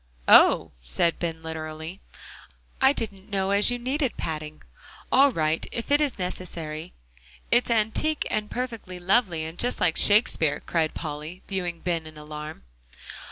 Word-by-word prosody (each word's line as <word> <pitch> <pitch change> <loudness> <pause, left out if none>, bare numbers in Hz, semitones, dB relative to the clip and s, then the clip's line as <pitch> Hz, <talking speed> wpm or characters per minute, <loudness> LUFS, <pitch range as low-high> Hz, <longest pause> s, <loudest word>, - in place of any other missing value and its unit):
"Oh!" - - +6
said 65 - 0
Ben 165 -2 -4
literally, 160 +2 -6 0.8
"I 265 0 +6
didn't 205 -6 -4
know 195 -1 0
as 200 +3 +4
you 245 - 0
needed 260 +2 -2
padding. 155 -1 -5 0.5
All 275 +1 +6
right, 155 -5 0
if 230 +4 -5
it 290 +1 +4
is 290 -4 0
necessary." 170 -3 -5 0.6
"It's 240 +1 +3
antique, 235 +7 +1
and 210 0 -1
perfectly 230 -7 -5
lovely, 180 -3 +1
and 160 +2 -8
just 245 - 0
like 170 -3 +2
Shakespeare," 205 -8 +4
cried 160 -2 -1
Polly, 155 +3 -6
viewing 180 -4 -3
Ben 165 -3 -2
in 155 -1 -12
alarm. 150 +1 -8
180 Hz, 145 wpm, -26 LUFS, 160-225 Hz, 0.8 s, Oh